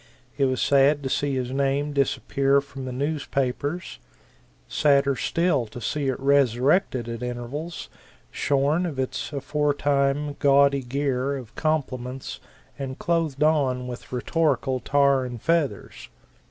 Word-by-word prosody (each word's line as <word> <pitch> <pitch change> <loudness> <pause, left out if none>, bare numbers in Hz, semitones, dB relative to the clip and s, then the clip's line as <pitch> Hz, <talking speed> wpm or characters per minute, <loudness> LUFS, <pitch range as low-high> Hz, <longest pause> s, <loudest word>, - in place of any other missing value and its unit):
It 140 - +2
was 130 -1 0
sad 140 +1 +3
to 135 - -2
see 140 +1 0
his 125 -1 -2
name 140 +2 0
disappear 140 0 +2
from 140 -1 -8
the 130 - -4
newspapers; 140 - -2 0.7
sadder 140 -2 +3
still 165 -5 0
to 115 - -9
see 140 +5 -2
it 130 - -1
resurrected 135 - +2
at 115 0 -5
intervals, 125 +7 -5 0.4
shorn 145 +5 +1
of 150 -5 -6
its 130 +1 -3
aforetime 145 0 0
gaudy 140 0 +4
gear 135 +1 -1
of 125 -5 -10
compliments 130 -5 -3 0.4
and 135 -1 -5
clothed 160 -4 0
on 135 -5 +2
with 125 -1 -8
rhetorical 135 0 0
tar 140 0 +3
and 120 -2 -6
feathers. 160 -11 -1
140 Hz, 125 wpm, -25 LUFS, 130-145 Hz, 0.7 s, gaudy